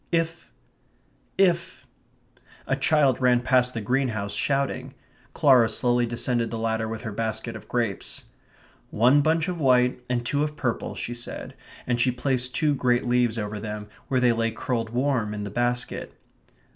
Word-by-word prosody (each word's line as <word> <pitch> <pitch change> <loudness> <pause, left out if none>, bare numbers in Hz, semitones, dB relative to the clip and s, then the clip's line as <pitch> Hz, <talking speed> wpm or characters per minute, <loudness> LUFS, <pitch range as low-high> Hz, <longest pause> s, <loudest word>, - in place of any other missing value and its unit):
"If... 165 0 -1 0.9
if 185 -2 +1 0.4
..." - - -34 0.2
A 135 - +1
child 140 -2 +2
ran 125 -1 +4
past 125 -1 +2
the 115 - -2
greenhouse 110 -3 -1
shouting. 135 +6 -1 0.4
Clara 125 -5 +5
slowly 120 0 +1
descended 120 0 0
the 115 - -4
ladder 110 0 -1
with 110 0 -5
her 110 - -4
basket 110 +2 -3
of 110 - -10
grapes. 115 -5 -3 0.7
"One 125 +7 +4
bunch 160 +2 +1
of 180 -2 -3
white, 125 -3 +3
and 120 -1 -1
two 140 +4 0
of 150 0 -3
purple," 130 -6 -2
she 120 - -4
said, 120 0 -5 0.3
and 120 -1 0
she 130 - +3
placed 125 0 -1
two 150 -2 +2
great 125 -2 +1
leaves 120 -2 +2
over 105 -1 -3
them 105 0 -6 0.2
where 130 - +1
they 125 -1 +4
lay 115 0 0
curled 115 0 -3
warm 120 -3 0
in 105 - -4
the 100 - -5
basket. 120 +2 -2
125 Hz, 165 wpm, -25 LUFS, 115-135 Hz, 0.9 s, Clara